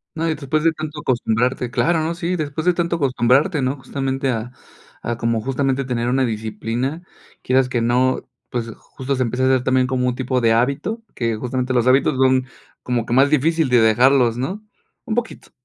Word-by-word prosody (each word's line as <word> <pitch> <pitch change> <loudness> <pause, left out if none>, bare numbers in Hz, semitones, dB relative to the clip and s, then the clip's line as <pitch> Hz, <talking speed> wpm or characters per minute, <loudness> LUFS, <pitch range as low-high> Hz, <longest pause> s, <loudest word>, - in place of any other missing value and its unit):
No, 165 +1 -1
y 160 - 0
después 150 +1 -2
de 165 - +4
tanto 155 -1 -6
acostumbrarte, 125 -1 0
claro, 165 +8 +1
¿no? 165 +2 -2
Sí, 175 +1 -2
después 155 -1 -3
de 180 - +4
tanto 170 0 -1
acostumbrarte, 135 +3 +2
¿no? 130 +2 -1
Justamente, 135 0 -3
ah 120 0 -3 0.5
ah, 120 -1 -2
como 115 -1 0
justamente 135 +2 -1
tener 120 -2 -1
una 130 +1 +2
disciplina, 115 +6 -3 0.4
quieras 130 0 +2
que 120 -2 -1
no, 125 +2 +1 0.2
pues, 120 -2 -3
justo 135 +1 -5
se 130 - 0
empieza 125 +2 -2
a - - +3
hacer 130 -1 +2
también 130 0 +2
como 125 -1 0
un 125 - +1
tipo 130 0 -1
de 115 -1 +3
hábito, 140 - 0
que 115 -2 -1
justamente 125 +2 -2
los 120 -1 +2
hábitos 130 0 +3
son 130 -1 +3 0.4
como 120 -2 -1
que 120 - -3
más 135 +3 +5
difícil 155 +1 +2
de 125 -1 +5
dejarlos, 120 +2 +4
¿no? 180 +12 -3 0.4
Un 220 - -2
poquito. 240 -2 -4
130 Hz, 195 wpm, -20 LUFS, 120-145 Hz, 0.5 s, más